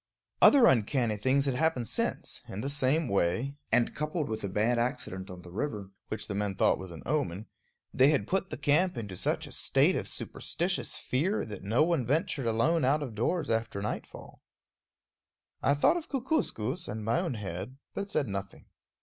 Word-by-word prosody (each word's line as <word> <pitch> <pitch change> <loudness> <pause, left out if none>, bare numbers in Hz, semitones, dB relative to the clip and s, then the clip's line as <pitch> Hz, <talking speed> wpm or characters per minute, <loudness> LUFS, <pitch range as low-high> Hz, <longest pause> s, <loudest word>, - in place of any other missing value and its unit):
Other 275 -4 +8
uncanny 120 - +3
things 130 +6 +2
had 135 - +1
happened 130 -4 +1
since, - - -2
in 95 - -5
the 135 +4 -2
same 145 +2 +1
way, 100 +7 +1 0.2
and 120 - +3
coupled 150 -1 -2
with 110 0 -3
a 100 - -2
bad 110 +5 +1
accident 95 -5 -3
on 90 -1 -9
the 90 - -11
river, 105 -2 -4 0.2
which 110 - -4
the 105 - -3
men 100 -1 -1
thought - - +3
was 95 - -7
an 85 -2 -9
omen, 110 - -1 0.5
they 130 +2 +6
had 145 -9 +2
put 190 0 0
the - - -5
camp 150 +3 +2
into 105 -5 -5
such - - 0
a - - -11
state - - +3
of - - -2
superstitious 180 +2 -2
fear 170 +12 0
that 105 -3 -7
no 110 +9 +2
one 165 -5 +1
ventured 145 - 0
alone 145 +9 +2
out 145 +4 +2
of 125 -5 -6
doors 155 +10 0
after 115 -2 -1
nightfall. 105 - -6 1.2
I 140 - +3
thought 320 - +4
of 335 - -7
Kookooskoos 235 - -1
and 110 0 -5
my 115 +2 +2
own 125 - -2
head, 100 +4 -6 0.2
but 200 0 -4
said 155 -8 0
nothing. 100 -1 -6
125 Hz, 185 wpm, -30 LUFS, 105-150 Hz, 1.2 s, Other